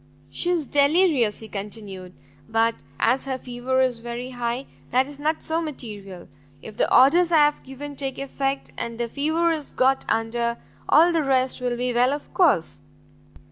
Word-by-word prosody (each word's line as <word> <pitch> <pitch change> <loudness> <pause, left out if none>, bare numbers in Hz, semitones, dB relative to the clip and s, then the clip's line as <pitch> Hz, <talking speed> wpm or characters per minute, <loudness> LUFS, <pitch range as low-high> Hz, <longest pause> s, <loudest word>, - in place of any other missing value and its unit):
"She 345 - -2
is 340 -4 +1
very 285 +2 +3
delirious," 295 - +3
he 220 - -9
continued, 195 -3 -7 0.4
"but 225 +1 +2 0.3
as 250 +4 +2
her 265 -1 -2
fever 255 +1 -1
is 255 -3 +1
very 240 +2 -6
high, 245 +1 -3 0.2
that 255 +2 +3
is 285 0 -11
not 310 +2 -1
so 325 +1 0
material. 210 - -6 0.3
If 215 +8 -10
the - - 0
orders 335 +7 +5
I 330 - +5
have 295 - 0
given 285 +2 -8
take 270 -1 -4
effect, 275 0 -3
and 230 -1 -4
the 235 - -1
fever 315 +7 +1
is 310 -3 -3
got 265 +1 +2
under, 235 +1 0 0.3
all 335 +3 +6
the 330 - +2
rest 260 -2 +1
will 245 -1 -1
be 250 0 -1
well 250 +3 +3
of 290 - -7
course." - - +2
260 Hz, 180 wpm, -24 LUFS, 235-290 Hz, 0.4 s, all